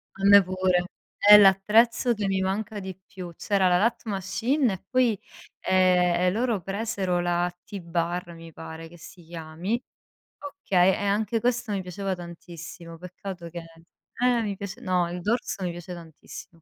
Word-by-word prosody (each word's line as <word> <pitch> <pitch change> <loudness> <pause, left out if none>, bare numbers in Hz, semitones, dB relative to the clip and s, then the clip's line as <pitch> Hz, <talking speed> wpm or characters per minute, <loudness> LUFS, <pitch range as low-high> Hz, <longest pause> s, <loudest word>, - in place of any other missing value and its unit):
A 195 0 -3
me 200 0 +8
pure. 185 -1 +1 0.3
È 210 0 +9
l'attrezzo 215 +5 +4
che 210 -3 -2
mi 190 -1 0
manca 205 +2 -2
di 190 -1 -8
più. 180 -3 -9
C'era 195 -3 +1
la 180 - +4
lat 230 +5 +1
machine 220 +6 0
e 185 - -8
poi, 250 -5 +2 0.4
ehm, 180 -2 +3
e 180 - +3
loro 230 +1 0
presero 195 -2 -2
la 175 0 0
T-Bar, 175 -2 -3
mi 165 0 -12
pare 160 +1 -9
che 175 - -15
si 170 +1 -14
chiami. 165 +7 -4 0.8
Okay, 185 0 +4
e 205 - -3
anche 215 +3 0
questo 240 -1 0
mi 195 - -1
piaceva 190 +1 -4
tantissimo, 170 -1 -10
peccato 180 0 -8
che 170 +1 -7 0.6
eh, 245 -1 +3
mi 205 -2 -3
piace 200 +5 -7
no, 180 -5 0
il 180 0 -5
dorso 210 -1 -2
mi 180 - -1
piace 175 +1 -8
tantissimo. 165 0 -12
185 Hz, 165 wpm, -26 LUFS, 175-205 Hz, 0.8 s, È